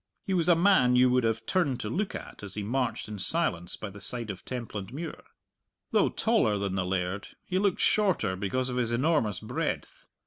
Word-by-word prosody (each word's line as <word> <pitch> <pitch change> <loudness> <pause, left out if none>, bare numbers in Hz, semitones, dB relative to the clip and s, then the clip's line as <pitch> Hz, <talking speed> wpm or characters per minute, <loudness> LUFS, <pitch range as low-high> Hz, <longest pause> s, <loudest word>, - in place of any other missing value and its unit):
He 195 - -1
was 175 -2 +2
a 175 - +7
man 165 -9 +5
you 125 0 +5
would 125 0 +3
have 115 0 0
turned 160 -10 +1
to - - -3
look 190 - -2
at - - -8
as 100 -1 -5
he 105 - -3
marched 125 +2 -1
in 105 -1 -6
silence 90 - 0
by 110 - -7
the 100 +1 -11
side 115 -1 -3
of 95 - -9
Templandmuir. 125 - -5 0.7
Though - - +4
taller 105 -1 +2
than 100 -1 -2
the 95 -2 -1
laird, 90 +1 -2 0.2
he 185 0 0
looked 200 -2 +1
shorter 190 - +2
because 105 +7 -1
of 125 - -3
his 120 -2 +1
enormous 120 - +1
breadth. - - -4
120 Hz, 200 wpm, -28 LUFS, 100-160 Hz, 0.7 s, a